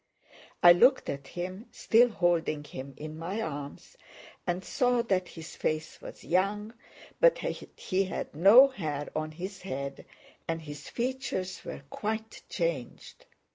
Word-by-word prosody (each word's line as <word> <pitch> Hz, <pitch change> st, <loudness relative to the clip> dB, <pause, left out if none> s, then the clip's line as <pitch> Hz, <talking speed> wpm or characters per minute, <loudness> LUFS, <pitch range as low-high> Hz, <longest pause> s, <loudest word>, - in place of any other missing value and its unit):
I 175 Hz, -, +11 dB
looked 250 Hz, +9 st, +4 dB
at 140 Hz, -1 st, -7 dB
him, 185 Hz, +6 st, -6 dB
still 240 Hz, +2 st, +4 dB
holding 170 Hz, -7 st, +1 dB
him 135 Hz, -1 st, -8 dB
in 155 Hz, +1 st, -7 dB
my 185 Hz, +6 st, -3 dB
arms, 145 Hz, -8 st, -6 dB, 0.5 s
and 180 Hz, +1 st, -1 dB
saw 245 Hz, -2 st, +2 dB
that 185 Hz, -5 st, 0 dB
his 160 Hz, -2 st, -10 dB
face 155 Hz, 0 st, -2 dB
was -, -, -10 dB
young, 205 Hz, +5 st, 0 dB, 0.5 s
but -, -, +6 dB
that -, -, -4 dB, 0.2 s
he 195 Hz, +1 st, 0 dB
had 190 Hz, -, -5 dB
no 215 Hz, -, +8 dB
hair 150 Hz, -, -4 dB
on 155 Hz, 0 st, -1 dB
his 185 Hz, +5 st, -7 dB
head 140 Hz, -6 st, -5 dB, 0.4 s
and 165 Hz, 0 st, -1 dB
his 145 Hz, -1 st, -8 dB
features 245 Hz, -7 st, -3 dB
were -, -, -7 dB
quite 220 Hz, +1 st, -4 dB
changed. 165 Hz, -8 st, -4 dB
180 Hz, 140 wpm, -29 LUFS, 155-215 Hz, 0.5 s, I